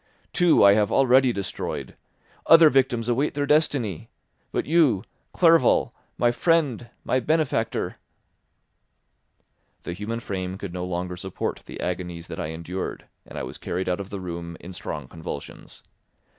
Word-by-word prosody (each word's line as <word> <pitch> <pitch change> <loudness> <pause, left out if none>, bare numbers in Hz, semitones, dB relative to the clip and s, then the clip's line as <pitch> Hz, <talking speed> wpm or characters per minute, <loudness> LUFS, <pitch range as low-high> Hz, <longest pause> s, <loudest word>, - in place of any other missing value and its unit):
Two 175 - +4
I 100 0 +8
have 105 -1 +2
already 130 -1 +5
destroyed; 100 -4 -4 0.5
other 165 -2 +8
victims 125 -3 +2
await 130 +5 0
their 145 0 0
destiny; 140 - +1 0.4
but - - -1
you, 145 - +3 0.3
Clerval, 165 -7 +4 0.2
my 120 -1 +3
friend, 135 -4 +1
my 130 - +1
benefactor—" 150 -4 0 1.9
The 85 - -4
human 105 +5 -4
frame 95 -4 -4
could 95 -3 -7
no 90 0 -3
longer 90 0 -3
support 95 +1 -4
the - - -9
agonies 90 -2 -4
that - - -6
I - - -2
endured, 85 +4 -5 0.2
and - - -10
I - - -3
was - - -7
carried 95 +2 -3
out 90 0 0
of 100 -1 -6
the 100 - -5
room 85 -2 -6
in 90 - -10
strong 75 -5 -6
convulsions. 80 -1 -9
105 Hz, 145 wpm, -25 LUFS, 90-135 Hz, 1.9 s, I